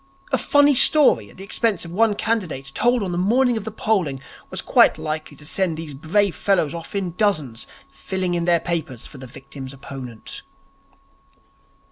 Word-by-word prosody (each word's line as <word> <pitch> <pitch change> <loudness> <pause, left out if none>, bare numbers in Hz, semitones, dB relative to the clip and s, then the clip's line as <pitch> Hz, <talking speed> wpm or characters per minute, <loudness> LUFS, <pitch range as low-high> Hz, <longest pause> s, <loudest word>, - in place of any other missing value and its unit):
A - - +3
funny 285 0 +4
story 265 - +5
at - - -17
the 190 - -9
expense 205 -1 0
of 170 - -9
one 210 +3 +2
candidate 180 -13 -2
told 240 -2 +2
on 185 - -3
the 175 - -2
morning 240 +6 +3
of 220 -2 -4
the 220 - -4
polling, 190 -11 0 0.3
was - - -4
quite - - +4
likely 155 -1 -5
to 150 - -11
send 170 0 0
these 160 -2 -7
brave 175 +7 +1
fellows 175 -7 +1
off 170 +3 -8
in 190 -3 -1
dozens 155 - 0 0.2
filling 185 -2 -3
in 170 -1 -1
their 170 -1 +3
papers 160 -9 -3
for 140 - -11
the 130 - -9
victim's 135 +1 -10
opponent. 130 -4 -8
175 Hz, 175 wpm, -22 LUFS, 140-210 Hz, 0.3 s, story